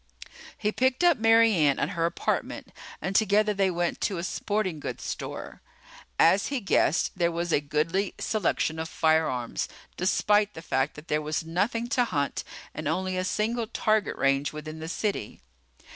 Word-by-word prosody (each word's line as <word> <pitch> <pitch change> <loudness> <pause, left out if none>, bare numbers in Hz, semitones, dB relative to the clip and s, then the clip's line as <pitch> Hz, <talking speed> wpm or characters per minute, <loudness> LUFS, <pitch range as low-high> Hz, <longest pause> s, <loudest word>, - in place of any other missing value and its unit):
He 210 0 0
picked 260 +7 +1
up 345 -8 +5
Mary 225 0 +5
Ann 150 -6 +3
at 150 - 0
her 165 -3 +1
apartment 170 - -3 0.3
and 190 +3 -2
together 210 0 +3
they 195 -1 +2
went 175 -1 -1
to 195 - 0
a 170 - -3
sporting 190 -3 -2
goods - - -6
store. - - -6 0.6
As 190 +4 +4
he 280 -2 -1
guessed 190 - +2
there 170 -2 +1
was 170 0 -2
a - - +3
goodly 165 +7 -1
selection 165 -6 0
of 160 0 -4
firearms, 155 - 0 0.3
despite 205 +2 +2
the 160 - -8
fact 135 -2 0
that 150 +3 -12
there 150 0 0
was 155 +2 -2
nothing 205 +8 -1
to 250 -2 +2
hunt 145 -9 -2 0.3
and 155 0 -5
only 185 +4 -1
a 185 - 0
single 220 +4 -1
target 215 -1 +1
range 135 +1 +1
within 155 +1 -7
the 160 +1 -6
city. 200 - -3
180 Hz, 170 wpm, -27 LUFS, 155-210 Hz, 0.6 s, up